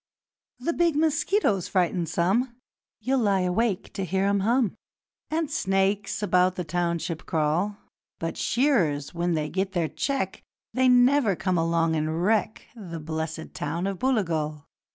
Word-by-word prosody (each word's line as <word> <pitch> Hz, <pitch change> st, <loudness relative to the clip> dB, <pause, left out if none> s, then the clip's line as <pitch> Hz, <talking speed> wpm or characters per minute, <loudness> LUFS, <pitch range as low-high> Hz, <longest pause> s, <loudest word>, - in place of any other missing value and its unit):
'The 270 Hz, +7 st, -2 dB
big 340 Hz, -3 st, +2 dB
mosquitoes 305 Hz, -, +1 dB
frighten 175 Hz, -2 st, +1 dB
some 200 Hz, +10 st, +1 dB, 0.5 s
You'll 260 Hz, +4 st, +1 dB
lie 200 Hz, -4 st, +2 dB
awake 185 Hz, +2 st, 0 dB
to 195 Hz, -, -3 dB
hear 190 Hz, +2 st, 0 dB
'em 200 Hz, 0 st, +2 dB
hum 230 Hz, +1 st, +2 dB, 0.6 s
And 315 Hz, -1 st, -1 dB
snakes 195 Hz, -4 st, 0 dB
about 185 Hz, -2 st, +3 dB
the 180 Hz, -, -3 dB
township 170 Hz, 0 st, -2 dB
crawl; 165 Hz, +6 st, 0 dB, 0.4 s
But 165 Hz, 0 st, -3 dB
shearers, 185 Hz, -, +1 dB
when 175 Hz, 0 st, 0 dB
they 155 Hz, -1 st, -1 dB
get 190 Hz, +4 st, -2 dB
their 170 Hz, -4 st, 0 dB
cheque, 275 Hz, -1 st, -2 dB, 0.3 s
They 255 Hz, 0 st, +3 dB
never 250 Hz, -3 st, +4 dB
come 185 Hz, -1 st, 0 dB
along 165 Hz, 0 st, +1 dB
and 155 Hz, +2 st, -1 dB
wreck 215 Hz, +1 st, +1 dB
The 175 Hz, -7 st, -7 dB
blessed 160 Hz, +1 st, -5 dB
town 165 Hz, +5 st, -3 dB
of 195 Hz, -2 st, -3 dB
Booligal. 165 Hz, -, 0 dB
190 Hz, 145 wpm, -26 LUFS, 165-235 Hz, 0.6 s, never